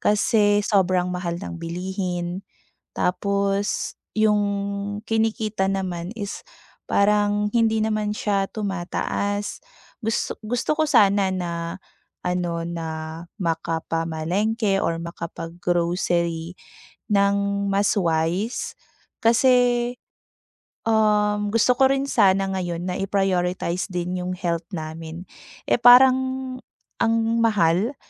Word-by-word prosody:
kasi 205 0 +3
sobrang 185 -3 +2
mahal 175 -1 -3
ng 175 -2 -7
bilihin, 180 +1 -3 0.5
tapos, 200 +2 -1 0.2
yung 215 -1 +3 0.7
kinikita 220 -2 0
naman 185 -2 -2
is, 205 -3 -6 0.4
parang 205 0 +2
hindi 225 -1 +3
naman 215 -1 0
siya 205 -2 0
tumataas, 205 +1 -3 0.4
gus 225 +1 -1
gusto 245 +7 -1
ko 315 - +2
sana 200 -8 +4
na, 170 0 -4 0.4
ano 175 -2 -2
na 165 -1 -4 0.5
makapamalengke 165 +5 -1
or 165 0 -1
makapag-grocery, 170 0 -2 0.6
ng 200 0 +2
mas 200 +1 +2
wise 175 +4 0 0.5
kasi, 245 +1 +3 0.9
um, 210 -2 +2
gusto 230 +2 +3
ko 265 - +7
rin 275 0 0
sana 195 -3 +4
ngayon 175 -1 -3
na - - -3
i-prioritize 185 -2 0
din 180 0 -3
yung 180 0 -3
health 170 -2 -2
namin, 160 +1 -6 0.4
eh, - - +1
parang 255 +2 +8 0.8
ang 225 0 +3 0.2
mahal 210 - +2
195 Hz, 95 wpm, -23 LUFS, 175-210 Hz, 0.9 s, parang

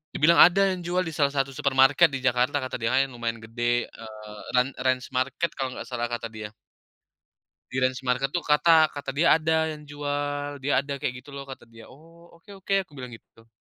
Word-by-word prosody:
Dia - - -3
bilang, 170 +2 +6
"Ada 180 +3 +7
yang 180 - -8
jual, 180 +2 0
di 165 - -5
salah 140 -2 +2
satu 135 0 0
supermarket 135 +4 +4
di 135 - -3
Jakarta," 130 +3 +1
kata 130 - -5
dia 115 +1 -1
Kak, 135 - +4
yang 135 - -15
lumayan 115 -1 -3
gede, 120 +2 -1
eee, 110 -1 -11 0.2
"Ran 125 +1 +4
Ranch 130 -1 0
Market," 140 +6 -1
kalau 130 -2 -4
nggak 115 - -7
salah, 120 -2 -3
kata 120 -1 -3
dia. 105 -1 -8 1.2
Di 130 - -4
Ranch 130 0 0
market 130 +2 -1
tuh, 175 - 0
kata 155 +2 +4
kata 145 -2 -6
dia, 150 +4 +3
ada 160 0 +1
yang 150 -1 -9
jual, 145 0 -4
"Dia 140 +2 +1
ada," 140 -1 -5
kayak 125 -1 -4
gitu 145 - -14
loh, 140 0 -8
kata 130 -3 -11
dia. 115 -1 -14
"Oh, 165 +4 -18
oke 170 +4 -19
oke," 195 +1 -2
aku 150 -7 -17
bilang 125 -2 -8
gitu 115 - -14
tuh. 115 0 -22
135 Hz, 220 wpm, -25 LUFS, 125-150 Hz, 1.2 s, Ada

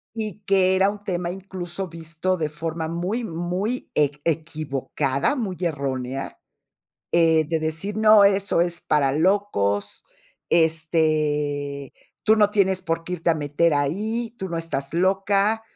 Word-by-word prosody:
Y 215 -3 -4
que 190 -1 +3
era 190 +1 +4
un 205 0 -7
tema 175 -3 -2
incluso 190 -1 -6
visto 165 +2 -3
de 155 -2 -1
forma 160 +1 -4
muy, 180 +8 -2
muy 180 +6 -3
eq 145 0 +1
equivocada, 155 - -1
muy 210 -9 -3
errónea, 135 -5 -3 0.7
eh, 165 -2 +4
de 165 -1 0
decir: 160 +6 -2
"No, 215 -1 +7
eso 200 -2 +3
es 175 0 0
para 140 -3 +2
locos, 145 - 0 0.5
este, 155 -4 +1 0.3
tú 220 - +6
no 210 -1 +4
tienes 190 -3 +2
por 165 -1 -2
qué 180 - -6
irte 170 -1 0
a - - +3
meter 155 +2 +1
ahí, 215 +11 -1
tú 190 - -5
no 170 - -3
estás 140 -5 -4
loca, 195 +4 +2
170 Hz, 140 wpm, -23 LUFS, 155-195 Hz, 0.7 s, No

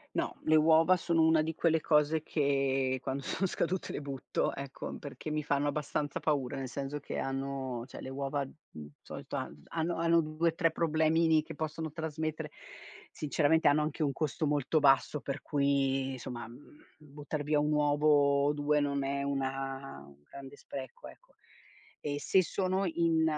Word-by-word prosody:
No, - - -1
le 155 - +5
uova 160 +3 +5
sono 170 -1 +1
una 160 -1 +4
di 160 +1 -3
quelle 160 0 +2
cose 150 0 +3
che 135 -3 +1
quando 135 +1 -3
sono 195 - -1
scadute 185 0 -2
le - - -4
butto. 140 -3 -2
Ecco, 140 -1 -6
perché 145 +2 -7
mi 155 0 -1
fanno 145 0 +1
abbastanza 145 0 -2
paura, 140 -3 -1
nel 135 -1 -4
senso 140 +2 -4
che 145 - -6
hanno 135 -2 -3
cioè - - -10
le - - -7
uova, 140 +1 -2
mhmm, 130 - -12
solito - - -7
han 75 0 -6
hanno 165 +1 -1
hanno 165 0 +4
2-3 165 +1 +1
problemini 160 0 +3
che - - -9
possono 155 0 -4
trasmettere. 155 -1 -4 0.6
Sinceramente 155 +1 +2
hanno 145 +1 +3
anche 155 +1 -2
un 145 -2 +1
costo 155 +1 -1
molto 145 +1 +1
basso, 140 +1 +4
per 140 +1 -5
cui 135 -2 +1
insomma 120 -2 -6 0.5
buttar 150 0 -6
via 150 0 +2
1 150 +1 +1
uovo 145 -1 +3
o 145 - +3
2 150 0 +2
non 140 -1 0
è 140 0 -1
una 135 - -3
un 70 0 -19
grande 135 - -11
spreco, 485 +1 -8
ecco. - - -18 0.7
E 145 -1 -3
se 190 - +4
sono 190 +2 0
in 165 -1 +2
145 Hz, 165 wpm, -31 LUFS, 135-160 Hz, 0.7 s, le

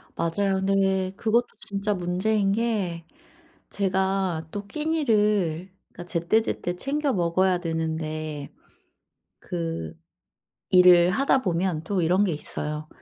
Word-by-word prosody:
맞아요. 195 +4 0
근데 195 -1 +1
그것도 235 +3 +1
진짜 200 +1 -2
문제인 195 +3 0
게 200 -7 -1 0.6
제가 190 -4 -1
또 205 0 -5
끼니를 210 - 0 0.2
그러니까 175 - -10
제때제때 175 +1 0
챙겨 280 +7 -1
먹어야 180 +1 +2
되는데 155 -3 -3 0.9
그 165 -2 -4 0.8
일을 180 -2 +7
하다 265 +5 +2
보면 175 -4 -1
또 190 +1 -1
이런 180 +5 +3
게 185 - 0
있어요. 150 0 -5
185 Hz, 230 characters per minute, -25 LUFS, 170-205 Hz, 0.9 s, 일을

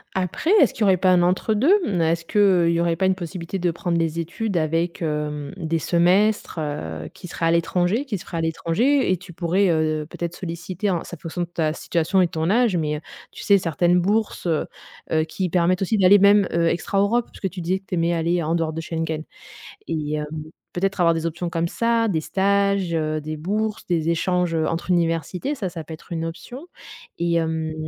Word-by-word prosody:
Après, 190 - -1
est-ce 270 - +4
qu'il - - -10
y - - +5
aurait 190 -2 +4
pas 185 +1 +2
un 175 -1 +4
entre-deux? 215 - +2 0.2
Mmh, 175 -3 0
est-ce 165 +1 +1
que 190 -2 +3
il - - +2
y 170 - +1
aurait 170 -1 +1
pas 190 +1 +1
une 190 - +2
possibilité 175 0 -5
de 175 -1 0
prendre 170 0 -2
les 165 0 -1
études 185 +4 -2
avec, 165 +3 -1
hem, 150 -2 -3
des 165 -2 -1
semestres, 180 +3 +2
heu, 80 - -4
qui - - -10
seraient 165 -1 -2
à - - +3
l'étranger, 175 - +1
qui 210 -9 -3
se - - -10
feraient 170 - -5
à - - 0
l'étranger 190 - +1
et 185 - +2
tu 175 0 -13
pourrais, 180 +3 +1
heu, 155 -1 +1
peut-être, 170 0 -5
solliciter, 180 +3 -4
hein, 175 -3 0
c'est - - -8
en - - -34
fonction 165 +3 -5
de 175 - -1
ta 160 -3 -1
situation 175 +3 0
et 180 - +3
ton 160 +1 -1
âge, 230 -4 +3
mais, 150 -2 -1
heu, - - -9 0.3
tu - - -10
sais, 200 -1 +5
certaines 175 +1 +2
bourses, 205 +2 0
heu 160 -3 0 0.4
heu, 155 0 +3
qui 180 +3 -3
permettent 180 +2 +2
aussi 210 +3 +1
d'aller 195 +1 +6
même, 200 -1 +5
heu, 170 0 +2
extra 195 +4 0
Europe 230 +4 +1
puisque 190 - -4
tu 180 -2 -6
disais 185 +3 0
que 195 - -32
tu 180 - -2
aimais 170 0 +1
aller 170 +1 0
en 160 +2 -1
dehors 165 -2 0
de 165 - -4
Schengen 160 -1 -3 0.7
et 155 -2 -2
hem, 150 0 -2 0.5
peut-être, 195 +1 -1
avoir 170 -1 +4
des 165 0 -2
options 170 +1 -3
comme 165 0 0
ça, 230 +5 +1
des 165 -7 0
stages, 200 -1 +1
heu, 155 -1 -1
des 155 +1 -5
bourses, 210 +6 -2
des 165 -2 0
échanges, 180 0 0
heu, 160 -1 +1
entre 165 +2 -3
universités, 175 - 0
ça, 195 -6 -3
ça 170 -2 -7
peut 160 - -10
être 165 - -13
une 165 0 -2
option 210 - -8 0.5
et 170 0 0
hem, 160 -1 -1
170 Hz, 225 wpm, -23 LUFS, 165-190 Hz, 0.7 s, d'aller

